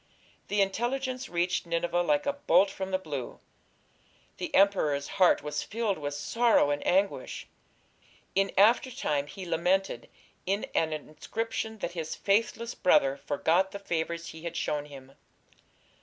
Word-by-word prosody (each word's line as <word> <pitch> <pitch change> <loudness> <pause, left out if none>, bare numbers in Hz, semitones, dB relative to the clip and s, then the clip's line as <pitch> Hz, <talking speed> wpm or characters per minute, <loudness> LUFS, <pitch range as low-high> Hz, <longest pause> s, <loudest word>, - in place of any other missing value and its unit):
The 205 0 +1
intelligence 255 +6 -2
reached 175 0 0
Nineveh 170 +1 0
like 150 -4 +1
a 285 - +1
bolt 205 -8 +3
from 190 0 -5
the 190 - +1
blue. 145 -9 -6 1.0
The - - -4
emperor's 155 -8 +3
heart 180 - +5
was 150 0 -2
filled 215 -5 -2
with 145 -1 -4
sorrow 225 +1 +3
and 145 - -1
anguish. 195 +2 0 0.9
In 195 0 +2
after 225 +6 +5
time 145 - -1
he 190 +3 -8
lamented 180 +3 0 0.4
in 200 +2 0
an 160 -1 +1
inscription 220 +9 -4
that - - -5
his 165 -3 -4
"faithless 230 +3 0
brother" 135 -6 +3
forgot 165 +7 +1
the 200 - -6
favours 170 -3 -3
he 160 - -10
had 170 0 -5
shown 150 -2 -1
him. 135 -2 -12
180 Hz, 140 wpm, -29 LUFS, 155-200 Hz, 1.0 s, heart